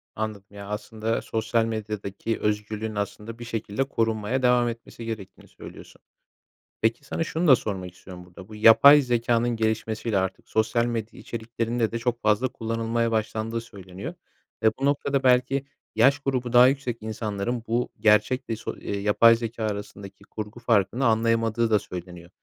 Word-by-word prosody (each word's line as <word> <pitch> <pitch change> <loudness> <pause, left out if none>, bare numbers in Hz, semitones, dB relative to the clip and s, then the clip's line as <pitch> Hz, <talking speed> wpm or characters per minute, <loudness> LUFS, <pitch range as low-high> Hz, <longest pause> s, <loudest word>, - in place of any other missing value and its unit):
Anladım. 110 -2 -4
Ya, 100 -1 -9
aslında, 110 +2 -3
sosyal 115 +1 0
medyadaki 110 -1 -4
özgürlüğün, 105 +1 -2
aslında, 105 +3 -5
bir 120 - -7
şekilde 115 +1 -2
korunmaya 115 -1 -1
devam 125 -1 +4
etmesi 115 0 -7
gerektiğini 110 -4 -7
söylüyorsun. - - -13 0.8
Peki 115 +4 +1
sana 150 - -2
şunu 165 +2 -1
da 135 - +9
sormak 95 -6 -5
istiyorum 90 0 -12
burada, 90 +1 -13
bu 110 - -11
yapay 125 +7 +8
zekânın 120 -2 +1
gelişmesiyle 110 -1 -1
artık 95 0 -3
sosyal 110 +2 +1
medya 115 -2 -4
içeriklerinde 115 0 -2
de 115 - -3
çok 120 0 -2
fazla 105 +4 +2
kullanılmaya 115 0 -2
başlandığı 110 +1 -2
söyleniyor, 100 - -9 0.5
eee, 110 - +5
bu 135 - 0
noktada 140 -1 +1
belki 130 +2 +3 0.3
yaş 135 +6 +4
grubu 130 -3 -2
daha 125 +1 +8
yüksek 130 -3 -1
insanların 110 +1 -3
bu 120 +2 0
gerçek 110 +5 +3
ve 115 - 0
so 110 - -6
eee, 100 - -4
yapay 105 +3 +5
zekâ 115 0 -5
arasındaki 100 -1 -6
kurgu 105 +3 -8
farkını 115 +1 +1
anlayamadığı 115 0 +2
da 105 -1 +4
söyleniyor. 90 -2 -9
115 Hz, 155 wpm, -25 LUFS, 105-120 Hz, 0.8 s, da